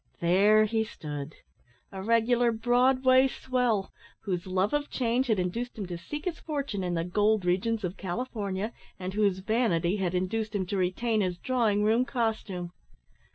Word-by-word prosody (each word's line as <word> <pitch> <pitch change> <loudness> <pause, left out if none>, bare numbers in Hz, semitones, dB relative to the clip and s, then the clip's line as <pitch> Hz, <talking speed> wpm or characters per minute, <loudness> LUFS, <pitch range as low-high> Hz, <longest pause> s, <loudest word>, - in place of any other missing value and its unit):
There 200 +5 +5
he 220 +1 0
stood, 150 -7 -7 0.6
a 190 -1 -6
regular 230 +3 +3
Broadway 255 +3 +4
swell, 245 -6 -1 0.3
whose 180 -2 -3
love 185 +4 0
of 295 0 0
change 250 +1 0
had 220 -3 +2
induced 225 +8 -3
him 205 - -3
to 175 -1 -5
seek 295 - -6
his 355 -3 -3
fortune 280 - -3
in 175 -1 -1
the 165 - 0
gold 205 +2 +1
regions 205 +5 0
of 180 +1 -3
California, 200 +1 -3 0.2
and 185 0 -5
whose 200 -3 +1
vanity 210 -6 +1
had 185 -2 -1
induced 210 +4 -1
him 190 -2 0
to 195 +2 -3
retain 215 +5 0
his 180 -2 -1
drawing 220 -3 +1
room 225 +4 +3
costume. 220 -8 -2
210 Hz, 160 wpm, -28 LUFS, 185-240 Hz, 0.6 s, There